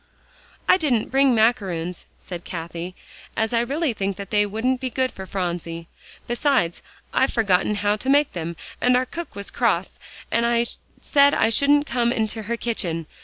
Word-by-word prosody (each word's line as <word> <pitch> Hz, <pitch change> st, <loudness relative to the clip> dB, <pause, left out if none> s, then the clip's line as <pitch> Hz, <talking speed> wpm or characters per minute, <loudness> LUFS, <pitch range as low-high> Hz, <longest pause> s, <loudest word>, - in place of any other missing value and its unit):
"I -, -, +6 dB
didn't 255 Hz, -, 0 dB
bring 270 Hz, -1 st, +4 dB
macaroons," 190 Hz, -7 st, 0 dB
said 175 Hz, -2 st, -8 dB
Cathie, 170 Hz, +1 st, -6 dB, 0.4 s
"as 220 Hz, 0 st, 0 dB
I 230 Hz, -, +3 dB
really 280 Hz, +3 st, 0 dB
think 195 Hz, -2 st, -2 dB
that 200 Hz, -1 st, -8 dB
they 210 Hz, -1 st, +3 dB
wouldn't 250 Hz, +5 st, -1 dB
be 260 Hz, -, -2 dB
good 260 Hz, +1 st, 0 dB
for 190 Hz, 0 st, -9 dB
Phronsie. 170 Hz, -3 st, -3 dB, 0.4 s
Besides, 240 Hz, -, +1 dB, 0.3 s
I've 265 Hz, -, +2 dB
forgotten 210 Hz, -2 st, +2 dB
how 205 Hz, +1 st, +1 dB
to 260 Hz, -, -4 dB
make 290 Hz, +1 st, +4 dB
them, 170 Hz, -2 st, -4 dB, 0.3 s
and 250 Hz, 0 st, +4 dB
our 255 Hz, -, +1 dB
cook 340 Hz, +6 st, -7 dB
was 200 Hz, 0 st, -5 dB
cross -, -, 0 dB, 0.3 s
and 235 Hz, 0 st, +2 dB, 0.3 s
said 285 Hz, -1 st, +4 dB
I 225 Hz, -, +3 dB
shouldn't 290 Hz, +4 st, +4 dB
come 240 Hz, -2 st, +1 dB
into 220 Hz, -1 st, -1 dB
her 230 Hz, +2 st, -3 dB
kitchen. 175 Hz, -9 st, -2 dB
225 Hz, 170 wpm, -23 LUFS, 185-255 Hz, 0.4 s, I